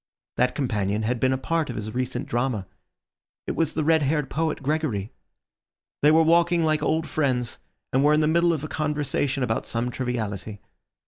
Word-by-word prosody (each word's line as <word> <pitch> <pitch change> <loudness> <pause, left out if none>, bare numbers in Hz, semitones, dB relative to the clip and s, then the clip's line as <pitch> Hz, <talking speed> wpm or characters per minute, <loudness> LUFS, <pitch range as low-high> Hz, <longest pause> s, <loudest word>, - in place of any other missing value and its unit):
That 125 0 +2
companion 105 -6 -1
had 120 +2 -1
been 130 +1 +2
a 130 - +1
part 165 +2 -1
of 120 - -4
his 110 0 -5
recent 125 +1 -2
drama; 120 -4 -1 0.8
it - - -3
was 165 -2 +1
the 155 - -1
red 160 +1 +4
haired 150 0 0
poet 160 -2 -1
Gregory. 135 -9 -1 0.9
They 150 - +6
were 160 +1 +6
walking 170 +1 +3
like 155 -1 +1
old 160 0 0
friends, 125 -6 -1 0.3
and 135 +2 +3
were 150 +1 +5
in 155 - +3
the 150 - +2
middle 170 +2 +3
of 155 -3 -2
a - - -3
conversation 145 -3 -1
about 110 -2 -1
some 120 +1 -1
triviality. 110 -5 -4
135 Hz, 185 wpm, -25 LUFS, 120-155 Hz, 0.9 s, They